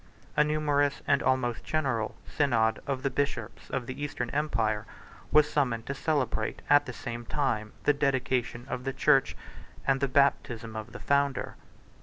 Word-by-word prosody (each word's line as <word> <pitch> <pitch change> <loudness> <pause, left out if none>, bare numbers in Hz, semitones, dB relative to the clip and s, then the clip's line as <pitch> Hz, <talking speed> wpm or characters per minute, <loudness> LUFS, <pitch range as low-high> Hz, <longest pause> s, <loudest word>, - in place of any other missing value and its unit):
A 150 - +5
numerous, 145 -2 +1
and 140 -1 +3
almost 125 -3 +1
general, 130 -8 -1
synod 115 -6 +2
of 135 -1 -2
the 140 - 0
bishops 140 +2 -3
of 130 -3 -2
the 130 +4 -6
Eastern 125 -4 -3
empire, 110 -7 0 0.4
was 150 0 +6
summoned 125 -7 0
to 140 - -3
celebrate, 140 -7 -1
at 145 0 +6
the - - -3
same 120 -1 -6
time, 115 -5 -1
the 145 - +4
dedication 130 -3 0
of 125 - -4
the 135 0 -2
church, 135 0 +3 0.5
and 135 0 +3
the 140 - +1
baptism 125 -5 +1
of 110 +1 -6
the 125 - -8
founder. 140 -1 +1
135 Hz, 160 wpm, -29 LUFS, 120-145 Hz, 0.5 s, was